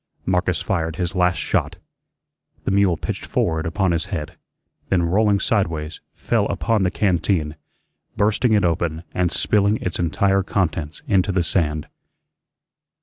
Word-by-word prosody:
Marcus 90 -1 0
fired 80 -4 -1
his 90 +1 -2
last 90 -2 +2
shot. - - -1 0.9
The - - -1
mule 95 -4 +3
pitched - - -4
forward 80 -1 -1
upon 95 +2 +1
his 85 -1 0
head, 80 -7 -5 0.5
then, 90 -2 +2
rolling 100 +4 +2
sideways, 80 -10 -1
fell - - 0
upon 115 -2 0
the 90 - +2
canteen, 90 -5 0 0.6
bursting 110 +3 +2
it 105 - +3
open 85 -1 -1
and 90 -1 +1
spilling 105 +1 +2
its 90 - -4
entire 95 +3 +2
contents 80 -6 -2
into 95 0 +2
the 90 -2 +1
sand. 75 -3 0
90 Hz, 140 wpm, -21 LUFS, 80-100 Hz, 0.9 s, mule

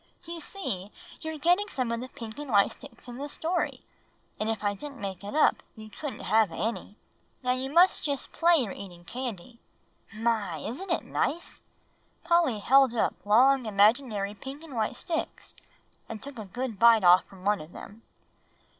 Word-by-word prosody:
"You 340 0 -6
see, 210 - -4 0.3
you're 315 -1 -5
getting 355 +7 +3
some 255 - -2
of 235 - -1
the 255 - -6
pink 230 -1 -9
and 295 -2 -6
white 200 -4 +4
sticks 280 -1 -12
in 245 0 -8
the 285 +2 -5
story; 335 +4 -2 0.5
and 215 - -1
if 225 -1 -2
I 205 0 +1
didn't 275 +6 -8
make 195 -2 -5
it 205 +7 -6
up, 310 - +4 0.2
you 215 -1 -11
couldn't 290 +6 -6
have 220 -4 +3
any. 215 +3 -3 0.5
Now 250 - +1
you 255 +1 -1
must 350 +4 +5
just 285 -3 -2
play 340 +1 +4
you're 250 -11 +1
eating 175 -3 -10
candy. 235 -1 -6 0.5
My, 215 -6 -1
isn't 260 - -6
it 340 - 0
nice!" 335 +4 -2 0.6
Polly 340 -8 +3
held 260 +3 +4
up 225 - +1
long 255 +3 +5
imaginary 210 0 +2
pink 270 +8 -9
and 315 -4 -11
white 220 +2 -1
sticks, 325 +5 -4 0.6
and 225 - -5
took 270 -1 -8
a 215 - -6
good 235 +2 -5
bite 230 -2 +7
off 180 +1 +7
from 190 -1 -15
one 205 -2 +2
of 155 +2 -11
them. 210 +5 -11
235 Hz, 180 wpm, -28 LUFS, 210-285 Hz, 0.6 s, bite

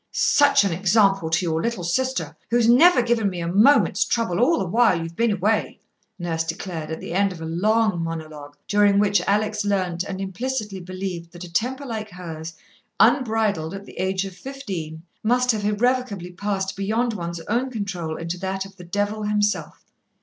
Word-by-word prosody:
"Such 280 -4 +4
an 195 -4 0
example 195 -1 +3
to 160 +3 +1
your 160 -1 0
little 230 -4 -2
sister, 260 +10 -1
who's 235 0 +3
never 255 +3 +6
given 230 -3 +1
me 180 -2 -6
a 170 - -3
moment's 215 +2 +4
trouble 225 -6 -1
all 310 +8 +4
the - - -1
while 215 -1 +3
you've 165 0 -6
been 230 +3 +2
away," 205 +3 0 0.4
Nurse 165 -3 -2
declared, 165 -1 -5
at 160 - -4
the - - -6
end 200 +1 +2
of 180 - -9
a 160 - -6
long 205 +3 +1
monologue 155 -3 -7
during 205 -1 +4
which 205 0 +3
Alex 210 +1 +1
learnt 185 -4 0
and 190 -1 -6
implicitly 205 +1 -3
believed 180 -2 -6
that 175 0 -9
a 170 -1 -11
temper 260 +9 -1
like 220 -4 -5
hers, 165 -3 -8 0.4
unbridled 215 - +2
at 200 0 -8
the - - -12
age 190 +1 0
of 190 -2 -8
fifteen, 185 - -6 0.2
must 250 +3 +2
have 210 -2 -3
irrevocably 210 -4 0
passed 195 +1 -3
beyond 220 +4 0
one's 170 -3 -5
own 240 +9 -1
control 195 -9 -4
into 170 +2 -4
that 190 +1 -3
of 195 - -14
the 180 - -10
Devil 205 +4 -2
himself. 210 0 -1
195 Hz, 180 wpm, -23 LUFS, 175-225 Hz, 0.4 s, never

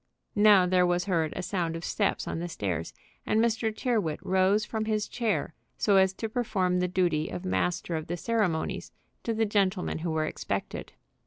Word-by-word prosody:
Now 205 -3 +6
there 180 0 +3
was 175 0 +1
heard 165 -5 +1
a 185 - -3
sound 175 -3 -1
of 165 - -5
steps 200 -2 0
on - - -3
the 175 +1 -4
stairs, 90 - -3 0.3
and 215 - +1
Mr. 225 -1 +1
Tyrrwhit 215 - -1
rose 190 +2 +3
from 220 0 -3
his 215 -1 0
chair 210 -10 -1 0.2
so 200 -2 +3
as 190 0 +5
to 225 - -4
perform 200 -6 0
the 180 - +1
duty 175 -4 +1
of 180 - -6
master 180 -2 0
of 155 -1 -4
the 175 - -3
ceremonies 200 -6 -1 0.3
to 230 - -2
the 225 0 +1
gentlemen 195 -5 0
who 170 +1 -3
were 160 -1 0
expected. - - -4
185 Hz, 185 wpm, -28 LUFS, 170-215 Hz, 0.3 s, Now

